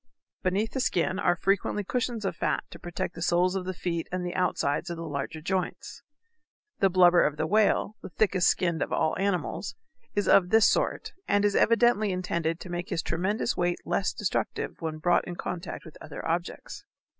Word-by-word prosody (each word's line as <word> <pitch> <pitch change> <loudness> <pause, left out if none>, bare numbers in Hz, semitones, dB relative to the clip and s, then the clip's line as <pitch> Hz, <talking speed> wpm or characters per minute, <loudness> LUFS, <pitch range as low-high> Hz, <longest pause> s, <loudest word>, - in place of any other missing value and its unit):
Beneath 200 +4 0
the 265 - -3
skin 185 -5 0
are 175 - +3
frequently 195 +3 0
cushions 235 0 -2
of - - -1
fat - - -1
to - - -10
protect 175 -1 -4
the 165 - -9
soles 180 +2 +2
of 185 -1 -2
the 185 - -3
feet 170 -1 -3
and 180 0 -2
the 175 - -3
outside 170 -3 0
of 170 - -3
the 165 - -5
larger 150 +1 -4
joints. 185 +3 -3 0.8
The 195 - +4
blubber 180 -1 +6
of 150 0 0
the 155 - 0
whale, 215 +2 +2
the - - -8
thickest 190 -1 +2
skinned 170 -3 +1
of - - -1
all 155 - +1
animals, 195 0 -1 0.4
is 205 - +1
of 180 -2 +5
this 220 0 +6
sort, - - 0
and 205 0 +3
is 205 - +2
evidently 230 -3 +4
intended 170 -2 -1
to 185 - -8
make 175 0 -4
his 165 - -1
tremendous 205 +7 -1
weight 175 0 -1
less 190 - 0
destructive 205 - -2
when 160 -1 -3
brought 175 +3 +2
in 175 - -5
contact 175 0 -5
with 160 - -12
other - - -7
objects. 170 +2 -3
180 Hz, 190 wpm, -27 LUFS, 170-200 Hz, 0.8 s, blubber